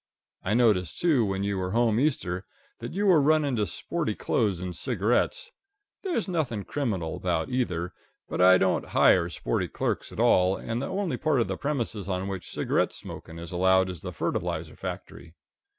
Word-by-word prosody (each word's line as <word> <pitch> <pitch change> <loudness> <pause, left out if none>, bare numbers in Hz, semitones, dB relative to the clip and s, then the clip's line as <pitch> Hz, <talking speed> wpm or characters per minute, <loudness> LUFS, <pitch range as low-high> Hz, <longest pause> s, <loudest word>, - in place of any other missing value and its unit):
I 105 - 0
noticed, 105 -8 +2
too, 155 -9 +3
when 95 -1 -1
you 100 -1 -1
were 90 +1 -2
home 115 -1 +3
Easter, 100 - 0 0.4
that 120 +1 -6
you 200 +3 -1
were 180 -6 +6
running 145 -2 +3
to 105 -2 +1
sporty - - -2
clothes 100 -6 0
and 90 -1 -5
cigarettes. 125 - 0 0.5
There's 345 - -1
nothing 145 - -1
criminal 95 - -2
about 85 -3 -1
either, 90 -9 -1 0.3
but - - -2
I 95 0 +8
don't 95 0 +1
hire 85 -1 +5
sporty - - -2
clerks - - -2
at - - -9
all, 95 +1 +4
and 115 +2 -3
the - - -2
only 190 -2 -2
part 155 -4 +1
of 115 - +1
the - - -2
premises 120 -9 -3
on 95 0 -2
which 95 -2 -5
cigarette - - 0
smoking 80 - -9
is 85 0 -8
allowed 95 +1 +3
is 90 - -9
the - - -5
fertilizer - - -3
factory. 80 -1 -8
105 Hz, 180 wpm, -27 LUFS, 90-135 Hz, 0.5 s, I